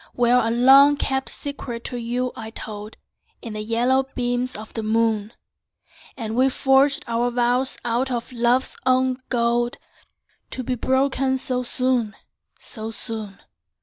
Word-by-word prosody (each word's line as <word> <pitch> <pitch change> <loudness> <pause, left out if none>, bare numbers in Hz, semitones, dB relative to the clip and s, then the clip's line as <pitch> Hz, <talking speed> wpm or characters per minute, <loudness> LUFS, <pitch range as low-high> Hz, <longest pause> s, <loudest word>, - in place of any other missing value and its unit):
Where 245 0 +4
a 225 -2 0
long 270 +5 +6
kept 265 -1 -1
secret 245 -5 -6
to 245 - -4
you 245 +2 -2
I 220 - -7
told, 215 -1 -7 0.5
In 230 - -6
the 215 - -4
yellow 245 +5 +1
beams 245 0 -1
of 215 +1 -10
the 225 - -3
moon, 220 -1 0 0.9
And 225 -3 -4
we 260 +2 +4
forged 270 +1 +2
our 235 +1 0
vows 245 +2 +1
out 240 +3 0
of 240 -1 -4
love's 245 +1 +1
own 255 0 +2
gold, 240 0 +1 0.7
To 255 - -5
be 255 - -2
broken 265 +1 +1
so 255 -1 0
soon, 250 -3 0 0.4
so 220 -2 -4
soon! 220 -3 -4
245 Hz, 145 wpm, -22 LUFS, 230-260 Hz, 0.9 s, long